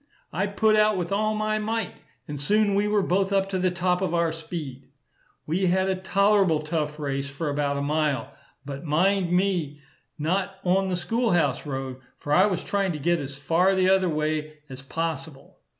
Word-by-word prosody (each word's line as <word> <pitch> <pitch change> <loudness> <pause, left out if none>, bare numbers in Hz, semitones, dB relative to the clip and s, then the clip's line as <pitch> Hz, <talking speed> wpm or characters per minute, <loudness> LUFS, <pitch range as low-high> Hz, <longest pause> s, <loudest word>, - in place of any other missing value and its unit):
I 195 +5 0
put 215 +2 +2
out 215 -1 +4
with 175 0 -3
all 215 +2 +1
my 215 0 0
might, 220 -1 -2 0.3
and 145 -1 -5
soon 205 +6 +2
we 205 +1 +2
were 210 -1 +2
both 190 +2 +1
up 195 -1 +2
to 190 -1 -1
the 185 0 +2
top 180 0 0
of 180 -3 0
our 170 -1 +2
speed. 150 -5 -7 0.6
We 180 +5 0
had 190 +2 +2
a 190 - +1
tolerable 195 -3 +2
tough 150 -1 -2
race 140 -2 -3
for 145 +2 -3
about 140 0 -1
a 140 - -2
mile; 150 -1 -1 0.3
but 140 0 -6
mind 175 +4 +2
me, 180 -6 0 0.4
not 185 +5 -1
on 190 +2 +2
the 180 -1 -1
school 230 +3 0
house 150 -5 +1
road, 135 -2 -4 0.2
for 145 - -3
I 185 +6 +6
was 185 -4 -2
trying 195 -3 0
to - - -4
get 170 +4 +1
as 140 -1 -6
far 170 +7 +2
the 185 -1 +2
t'other 190 -1 +3
way 155 0 -2
as 130 0 -8
possible. 160 -1 -5
175 Hz, 195 wpm, -25 LUFS, 150-195 Hz, 0.6 s, I